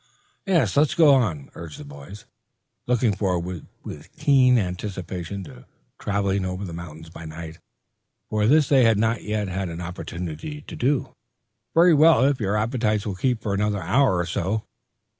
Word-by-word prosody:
"Yes; 180 -4 +2
let's 150 +3 +3
go 160 -5 +6
on," 90 - 0
urged 80 -3 -9
the 75 - -9
boys, 70 +8 -11 0.6
looking 120 -4 +2
forward 90 -3 -2 0.2
with 75 +4 -10
keen 130 -3 +4
anticipation 95 -1 -4
to 65 -7 -13 0.3
traveling 100 -1 0
over 95 +2 -4
the 85 - -7
mountains 80 -1 -9
by 85 - -10
night, 80 0 -8 0.7
for 105 0 +1
this 150 +2 +4
they 135 -3 +5
had 115 -2 +4
not 110 +2 +1
yet 105 -1 -2
had 95 0 -3
an 85 0 -6
opportunity 90 - -6
to - - -10
do. 135 +1 0 0.6
"Very 170 +1 +6
well, 155 -2 +6
if 140 -1 +2
your 105 +1 0
appetites 110 -1 0
will 105 - -2
keep 120 +3 -1
for 100 - -1
another 105 0 0
hour 100 +3 +3
or 85 - 0
so. 95 +5 -2
100 Hz, 165 wpm, -24 LUFS, 85-125 Hz, 0.7 s, go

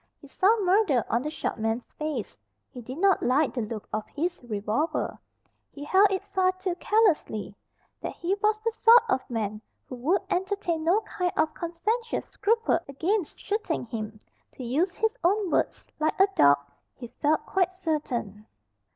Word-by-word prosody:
He 285 - -14
saw 405 +10 +3
murder 365 - +3
on 235 - +2
the 300 - -3
short 305 - -4
man's 225 +2 -1
face. 300 -8 -3 0.4
He 245 - -8
did 255 +4 -8
not 390 +2 +3
like 265 +5 +2
the 245 - -2
look 215 -1 -5
of 215 - -1
his 345 +4 -3
revolver. 220 +7 -2 0.5
He 285 - -9
held 385 +7 +5
it 385 +1 -2
far 375 -1 +2
too 370 -1 -3
carelessly. 345 - +1 0.5
That - - -4
he 350 +3 -1
was 430 0 +3
the 460 - +2
sort 455 +1 +6
of 260 -7 -1
man 215 -3 -3 0.3
who - - -8
would 335 +11 +1
entertain 365 -3 -1
no 360 +7 +3
kind 365 -4 -2
of 310 - +2
conscientious 425 +8 -2
scruple 450 -4 +1
against 330 +7 -1
shooting 410 - -2
him, 220 -2 -5 0.4
to 260 - -7
use 315 +10 0
his 445 0 +1
own 385 +1 +2
words, - - 0
like 310 +3 0
a 385 - +8
dog, 140 0 +6 0.4
he 240 -2 -9
felt 300 +1 +2
quite 370 -1 +1
certain. 275 - -3
330 Hz, 170 wpm, -27 LUFS, 245-390 Hz, 0.5 s, a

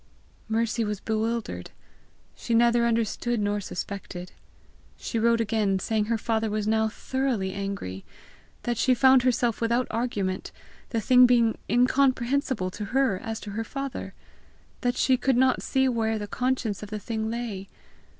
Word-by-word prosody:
Mercy 230 +1 0
was 210 -2 -2
bewildered. 220 - -2 0.7
She 235 - -2
neither 235 0 +4
understood 230 +1 0
nor 205 0 0
suspected. 185 -1 -6 0.7
She 230 - -3
wrote 230 +1 +3
again, 210 -3 +1
saying 215 +2 0
her 230 +1 0
father 220 0 -1
was 210 0 -2
now 220 0 +2
thoroughly 235 -4 -2
angry; 195 - -5 0.6
that 240 -1 -1
she 255 +1 +4
found 260 +1 +6
herself 240 -2 +1
without 235 +2 +2
argument, 210 -5 -2 0.4
the 230 -3 -1
thing 250 +3 +6
being 235 -2 +3
incomprehensible 250 -3 +2
to 210 +2 -5
her 250 -3 +1
as 225 -1 -5
to 205 - -7
her 220 +3 -3
father; 275 +2 -5 0.7
that 245 0 0
she 260 -1 +3
could 265 -1 +1
not 260 0 +3
see 265 0 +1
where 225 -3 0
the 205 - -4
conscience 250 -2 -1
of 210 - -7
the 215 - -4
thing 220 +1 -3
lay. 220 -5 -4
225 Hz, 150 wpm, -26 LUFS, 210-245 Hz, 0.7 s, found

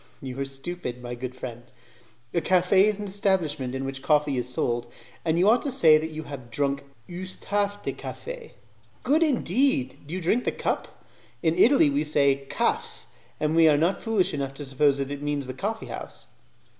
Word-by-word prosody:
"You 130 0 -7
are 140 - -1
stupid, 135 -2 -5
my 120 0 -5
good 125 +1 -6
friend. 120 -2 -7 0.7
A 170 - +1
cafe 185 +3 +4
is 210 -2 +1
the 210 - -5
establishment 185 -10 0
in 135 0 -3
which 135 0 -4
coffee 150 -1 +2
is 125 0 -2
sold, 120 -1 -1 0.3
and 165 0 +1
you 180 +3 +4
ought 230 +2 +5
to 280 - -2
say 160 -11 +6
that 160 +1 -4
you 155 0 -6
have 135 -5 -9
drunk 140 +3 -1 0.2
'use 185 +1 -7
tasse 205 0 -1
de - - -2
cafe'" 485 -2 -8 0.5
"Good 290 +6 +3
indeed! 260 - +1
Do 165 - -4
you - - -2
drink 200 +8 +1
the - - +1
cup? - - -4 0.4
In 160 -1 +2
Italy 205 - +5
we 145 +2 +1
say 145 -2 +3
a 135 0 -3
'caffs', - - -1 0.3
and 155 +1 0
we 165 -1 +7
are 150 - +4
not 170 +6 +1
foolish 200 -5 +1
enough 135 -2 -3
to 145 - -5
suppose 140 +1 +2
that 140 0 -3
it 145 0 -5
means 145 -1 -1
the 130 - -5
coffee 215 - -3
house." - - -8
155 Hz, 200 wpm, -26 LUFS, 135-190 Hz, 0.7 s, we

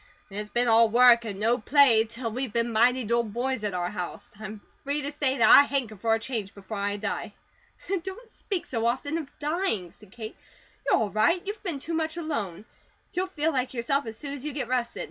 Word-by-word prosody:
IT'S 210 +1 -5
BEEN 240 +2 +1
ALL 225 0 +6
WORK 235 0 +6
AND 200 -3 -5
NO 230 +4 +2
PLAY 240 -2 +5
TILL 230 +1 -5
WE'VE 250 +1 -3
BEEN 235 0 0
MIGHTY 245 +3 +4
'DULL 235 +2 +1
BOYS' 240 +2 -2
AT 205 -3 -2
OUR 175 0 -2
HOUSE; 180 -4 -6
I'M 215 0 -7 0.2
FREE 290 0 0
TO 285 - 0
SAY 285 -2 0
THAT 235 - +5
I - - +11
HANKER 270 -6 -1
FOR 225 +3 +1
A - - -3
CHANGE 225 -4 -4
BEFORE 200 +2 -7
I 200 +1 -1
DIE." 215 +2 -4 0.7
"Don't 430 +6 -9
speak 390 -6 -3
so 230 -2 -1
often 285 +7 -1
of 295 -4 -7
dying," 300 - -1
said 210 -3 -18
Kate. 220 0 -8 0.5
"You're - - +5
all 210 -2 -1
right. 220 - +2
You've 410 +1 -5
been 345 -7 -2
too 320 +5 -5
much 320 0 -1
alone. 225 - -4 0.5
You'll 370 +1 -1
feel 320 -3 0
like 255 -1 -1
yourself 245 +3 0
as 220 0 -7
soon 280 +2 -6
as 280 -2 -7
you 300 -1 -4
get 275 -4 -3
rested." 245 -1 -1
240 Hz, 220 wpm, -27 LUFS, 220-285 Hz, 0.7 s, I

